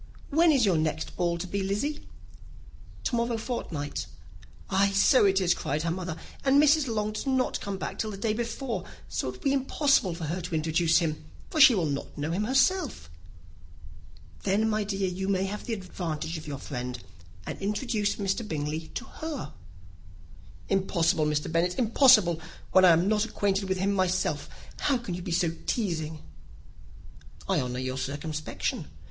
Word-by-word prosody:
"When 325 Hz, +3 st, +5 dB
is 265 Hz, -6 st, +4 dB
your 185 Hz, -5 st, +3 dB
next 155 Hz, 0 st, -2 dB
ball 175 Hz, -1 st, 0 dB
to 170 Hz, -, -4 dB
be, 200 Hz, +2 st, -2 dB
Lizzy?" 210 Hz, +11 st, -2 dB, 1.0 s
"To 245 Hz, -, 0 dB
morrow 235 Hz, 0 st, 0 dB
fortnight." 165 Hz, -, -4 dB, 0.6 s
"Ay, 195 Hz, +1 st, +3 dB
so 200 Hz, +4 st, +5 dB
it 195 Hz, -1 st, +4 dB
is," 180 Hz, -2 st, +3 dB
cried 150 Hz, +3 st, -2 dB
her 165 Hz, -, 0 dB
mother, 175 Hz, -2 st, -4 dB, 0.3 s
"and 275 Hz, +1 st, +5 dB
Mrs. 300 Hz, -1 st, +5 dB
Long 215 Hz, -2 st, -1 dB
does 215 Hz, +5 st, -5 dB
not 260 Hz, -1 st, +1 dB
come 200 Hz, -1 st, -4 dB
back -, -, -5 dB
till 220 Hz, -, -1 dB
the 200 Hz, -, -6 dB
day 215 Hz, +2 st, 0 dB
before; 235 Hz, +2 st, -3 dB, 0.2 s
so, -, -, -2 dB
it -, -, -5 dB
will -, -, -15 dB
be 275 Hz, -2 st, +2 dB
impossible 270 Hz, -, +2 dB
for 170 Hz, -, -7 dB
her 170 Hz, +4 st, -2 dB
to 170 Hz, -1 st, -4 dB
introduce 160 Hz, +1 st, +2 dB
him, 155 Hz, -3 st, -1 dB, 0.3 s
for 310 Hz, -, +2 dB
she 270 Hz, -4 st, +9 dB
will 180 Hz, -5 st, +1 dB
not 140 Hz, -2 st, -4 dB
know 150 Hz, +2 st, -2 dB
him 195 Hz, +5 st, 0 dB
herself." 270 Hz, -, +1 dB, 1.3 s
"Then, 205 Hz, +3 st, +2 dB
my 215 Hz, -1 st, +1 dB
dear, 195 Hz, -1 st, -1 dB
you 185 Hz, +1 st, -3 dB
may 190 Hz, -1 st, +1 dB
have 205 Hz, +2 st, -5 dB
the 235 Hz, -, -2 dB
advantage 170 Hz, -4 st, -4 dB
of 155 Hz, -1 st, -7 dB
your 140 Hz, -2 st, -4 dB
friend, 125 Hz, -2 st, -5 dB, 0.5 s
and -, -, -6 dB
introduce 205 Hz, 0 st, 0 dB
Mr. 195 Hz, +1 st, -1 dB
Bingley 155 Hz, 0 st, -3 dB
to 255 Hz, -, -4 dB
her." 305 Hz, -, -6 dB, 1.1 s
"Impossible, 170 Hz, -5 st, +2 dB
Mr. 150 Hz, 0 st, 0 dB
Bennet, 175 Hz, +2 st, +1 dB
impossible, 220 Hz, -, +5 dB, 0.3 s
when 185 Hz, 0 st, +7 dB
I -, -, +8 dB
am 170 Hz, +2 st, +4 dB
not 210 Hz, 0 st, +2 dB
acquainted 200 Hz, -3 st, -1 dB
with 190 Hz, -, +1 dB
him 195 Hz, +2 st, +1 dB
myself; 185 Hz, -1 st, 0 dB, 0.3 s
how 275 Hz, -, +2 dB
can 235 Hz, -7 st, -6 dB
you 180 Hz, -, -4 dB
be 175 Hz, -, -5 dB
so 170 Hz, -1 st, +2 dB, 0.2 s
teasing?" 160 Hz, -8 st, -2 dB, 1.2 s
"I -, -, +2 dB
honour 125 Hz, -1 st, -3 dB
your 130 Hz, +1 st, -3 dB
circumspection. 150 Hz, +3 st, -3 dB
190 Hz, 175 wpm, -28 LUFS, 165-225 Hz, 1.3 s, she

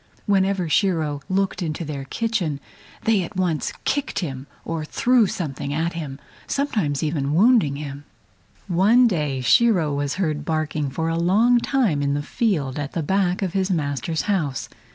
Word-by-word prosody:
Whenever 195 Hz, -3 st, +2 dB
Shiro 160 Hz, -4 st, +1 dB
happened 140 Hz, -, -28 dB
to -, -, -4 dB
look 195 Hz, -1 st, -3 dB
into 160 Hz, 0 st, -3 dB
their 140 Hz, -2 st, -5 dB
kitchen 185 Hz, -, -1 dB, 0.4 s
they 220 Hz, -3 st, +3 dB
at 180 Hz, +4 st, -6 dB
once 180 Hz, -4 st, 0 dB
kicked 285 Hz, 0 st, -1 dB
him 135 Hz, -6 st, -4 dB, 0.2 s
or 165 Hz, -1 st, -3 dB
threw 240 Hz, +7 st, +3 dB
something 140 Hz, -6 st, -4 dB
at 165 Hz, +2 st, -1 dB
him, 150 Hz, -5 st, -5 dB, 0.3 s
sometimes 200 Hz, -, -1 dB
even 150 Hz, -2 st, -1 dB
wounding 205 Hz, -, +4 dB
him. 145 Hz, 0 st, -7 dB, 0.6 s
One 205 Hz, +8 st, +4 dB
day 150 Hz, -, 0 dB
Shiro 165 Hz, -, +4 dB
was 145 Hz, 0 st, -1 dB
heard 155 Hz, -6 st, -1 dB
barking 155 Hz, -2 st, -1 dB
for 160 Hz, +4 st, -2 dB
a 165 Hz, 0 st, 0 dB
long 220 Hz, +8 st, +4 dB
time 235 Hz, -, +1 dB
in 140 Hz, 0 st, +1 dB
the 145 Hz, -, -2 dB
field 150 Hz, -, -1 dB
at 145 Hz, -1 st, -4 dB
the 165 Hz, -, -2 dB
back 190 Hz, +3 st, +1 dB
of 185 Hz, -2 st, -2 dB
his 190 Hz, -1 st, 0 dB
master's 155 Hz, -1 st, -1 dB
house. 155 Hz, -10 st, -1 dB
165 Hz, 170 wpm, -23 LUFS, 145-195 Hz, 0.6 s, wounding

